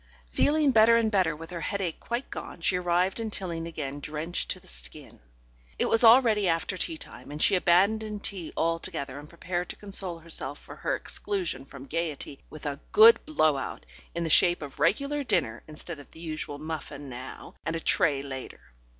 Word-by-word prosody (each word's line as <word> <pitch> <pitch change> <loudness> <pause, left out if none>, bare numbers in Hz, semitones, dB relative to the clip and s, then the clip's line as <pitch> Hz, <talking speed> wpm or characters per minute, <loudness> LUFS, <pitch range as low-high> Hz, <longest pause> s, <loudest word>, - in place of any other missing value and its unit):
Feeling 295 -1 +3
better 230 0 +6
and 225 -2 +1 0.2
with 165 +2 -10
her 170 -1 -5
headache 190 -3 -2
quite 240 +3 -3
gone, - - -7
she 180 - +2
arrived 180 +3 +1
in 225 -1 -3
Tilling 170 -5 -4
again 145 -4 -5
drenched 155 +4 -3
to - - -2
the - - -20
skin. - - -7 0.6
It - - +1
was 225 - +6
already 225 -4 +6
after 165 +2 0
tea 320 - -2
time, - - -10
and 150 +1 -6
she - - +4
abandoned 200 +4 +2
tea 180 -5 -4
altogether, 165 -5 -2
and 150 +1 -12
prepared 175 +1 -4
to - - -5
console 195 -4 -1
herself 160 -4 -1
for - - -12
her - - -1
exclusion 175 -10 -2
from 140 -1 -11
gaiety 150 -3 -3
with 155 -1 -11
a 140 -1 -3
"good 230 +2 +8
blow 155 - +3
out" 135 - -6 0.3
in 170 - -1
the 165 - -2
shape 175 -1 +5
of 145 0 -9
regular 280 - +1
dinner, 210 -8 0
instead 155 +1 -4
of 145 - -13
the - - -15
usual 155 -3 -5
muffin 150 -2 -6
now 130 0 -9
and 160 +2 -2
a - - -2
tray 140 -3 +2
later. 130 - -8
170 Hz, 185 wpm, -28 LUFS, 150-205 Hz, 0.6 s, good